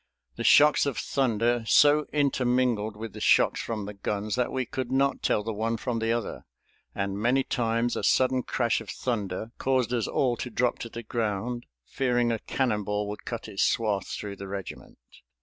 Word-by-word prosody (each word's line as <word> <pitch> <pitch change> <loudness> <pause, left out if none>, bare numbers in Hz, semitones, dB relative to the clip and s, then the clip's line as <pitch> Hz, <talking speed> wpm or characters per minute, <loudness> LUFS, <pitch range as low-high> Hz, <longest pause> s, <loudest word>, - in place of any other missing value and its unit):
The - - -4
shocks 150 0 +6
of 140 - -2
thunder 120 -3 +1
so 150 +3 +5
intermingled 125 -6 +1
with 110 -1 -7
the - - -9
shocks - - +4
from 110 -3 -4
the 105 - -6
guns 105 +1 -3
that 125 -1 0
we 130 -1 -1
could 130 0 -4
not 135 0 +1
tell 105 - +1
the 115 +1 -3
one 115 +2 -1
from 115 0 -2
the 115 0 0
other, 115 -2 -3 0.5
and 100 0 -2
many 125 +5 +2
times 115 -1 0
a - - -2
sudden 130 0 +3
crash 120 -2 0
of 110 - -11
thunder 110 -3 -3
caused 130 -2 +1
us 120 -3 0
all 125 -3 +1
to 125 - -4
drop 125 0 0
to 115 - -6
the 115 +1 -7
ground, 115 +1 -3 0.2
fearing 120 -2 +1
a 115 - -1
cannonball 105 -5 -1
would 105 - -7
cut 115 -2 -5
its 95 - -3
swath 105 -4 +1
through 100 -1 -6
the 100 - -7
regiment. 95 -1 -7
115 Hz, 185 wpm, -27 LUFS, 105-125 Hz, 0.5 s, shocks